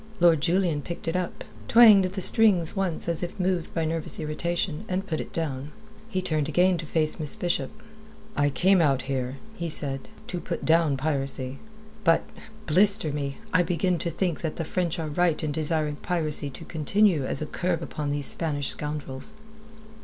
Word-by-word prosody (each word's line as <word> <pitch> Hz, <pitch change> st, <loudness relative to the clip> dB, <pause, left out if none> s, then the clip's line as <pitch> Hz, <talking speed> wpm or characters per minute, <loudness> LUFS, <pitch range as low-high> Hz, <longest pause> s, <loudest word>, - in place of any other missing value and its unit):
Lord 170 Hz, -3 st, +5 dB
Julian 170 Hz, -2 st, +1 dB
picked 170 Hz, +2 st, -7 dB
it 165 Hz, -, -1 dB
up, 180 Hz, -1 st, -3 dB, 0.2 s
twanged 220 Hz, -5 st, +7 dB
the 190 Hz, 0 st, -4 dB
strings 190 Hz, -5 st, +3 dB
once 190 Hz, -5 st, -1 dB
as 170 Hz, -1 st, +1 dB
if 175 Hz, +2 st, -5 dB
moved 180 Hz, -2 st, -1 dB
by 165 Hz, -1 st, 0 dB
nervous 160 Hz, 0 st, -2 dB
irritation, 165 Hz, +2 st, -2 dB
and 185 Hz, +1 st, -1 dB
put 160 Hz, -5 st, -3 dB
it -, -, -6 dB
down. 145 Hz, -3 st, -4 dB, 0.4 s
He 185 Hz, -4 st, -2 dB
turned 155 Hz, -4 st, -1 dB
again 180 Hz, +3 st, +3 dB
to 155 Hz, -, -6 dB
face 155 Hz, +1 st, +2 dB
Miss 155 Hz, +5 st, -2 dB
Bishop. 175 Hz, -9 st, -1 dB, 0.7 s
"I 145 Hz, 0 st, +2 dB
came 180 Hz, +7 st, +3 dB
out 135 Hz, -4 st, +2 dB
here," 130 Hz, -1 st, -3 dB, 0.2 s
he 170 Hz, -4 st, -4 dB
said, 135 Hz, -3 st, +2 dB, 0.2 s
"to 180 Hz, -, -4 dB
put -, -, -5 dB
down 160 Hz, -3 st, +3 dB
piracy. 135 Hz, -2 st, +1 dB, 0.4 s
But 165 Hz, -2 st, +4 dB, 0.4 s
blister 195 Hz, 0 st, +4 dB
me! 140 Hz, -1 st, -4 dB, 0.2 s
I 185 Hz, -, +5 dB
begin 175 Hz, 0 st, 0 dB
to 170 Hz, -, -2 dB
think 170 Hz, -1 st, -2 dB
that 160 Hz, -2 st, -3 dB
the 165 Hz, -, -3 dB
French 175 Hz, 0 st, -2 dB
are 160 Hz, -2 st, -3 dB
right 160 Hz, +1 st, 0 dB
in 155 Hz, -, -1 dB
desiring 155 Hz, -1 st, -1 dB
piracy 155 Hz, -4 st, 0 dB
to 130 Hz, -, -10 dB
continue 170 Hz, +1 st, +2 dB
as 130 Hz, -, -1 dB
a -, -, -3 dB
curb 175 Hz, +1 st, -2 dB
upon 150 Hz, -2 st, -4 dB
these 145 Hz, -1 st, -2 dB
Spanish 145 Hz, -3 st, -1 dB
scoundrels." 150 Hz, +3 st, -4 dB
165 Hz, 180 wpm, -26 LUFS, 145-180 Hz, 0.7 s, twanged